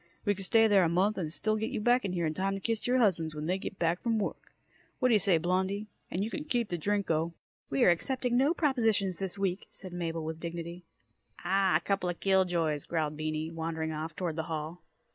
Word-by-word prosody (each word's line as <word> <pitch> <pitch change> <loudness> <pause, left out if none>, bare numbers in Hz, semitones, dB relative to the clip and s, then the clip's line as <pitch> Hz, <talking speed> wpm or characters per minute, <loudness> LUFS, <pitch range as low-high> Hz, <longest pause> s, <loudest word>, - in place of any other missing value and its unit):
We 205 - +3
could 195 -1 -5
stay 225 +4 +5
there 205 -3 +5
a 165 - +3
month, 190 +5 +2
and 160 -4 -3
still 215 +6 0
get 220 +1 -2
you - - -3
back 245 +4 +4
here 175 -2 -1
in 155 - 0
time 195 +3 -1
to - - -4
kiss 225 +3 -1
your 250 +1 +3
husbands 165 -9 +2
when 150 0 -4
they 185 +3 0
get 195 - -5
in 165 0 +2
from 230 +2 0
work. 205 - -4 0.5
Whaddya 250 -5 +4
say, 185 -3 +4
Blondie? 190 +5 0 0.2
And 185 - -1
you 220 - -3
can 300 - -4
keep 240 -7 -1
the 175 - -1
Drinko!" 170 -4 0 0.4
"We 135 - +2
are - - +7
accepting 250 +7 0
no 280 +7 +3
propositions 225 - +1
this 195 0 -3
week," 195 -1 -1
said 185 -2 -9
Mabel 165 -2 -3
with 160 0 -4
dignity. 170 +1 -6 0.6
"Ah 190 0 +3
h, - - +2
a - - -35
coupla 180 -3 -1
kill 190 -1 +3
joys," 160 -5 0
growled 155 -3 -1
Beany, 155 +1 -3
wandering 160 -1 -3
off 155 +1 -5
toward 170 -4 -3
the 160 - -1
hall. 160 +2 -4
185 Hz, 225 wpm, -30 LUFS, 165-205 Hz, 0.6 s, are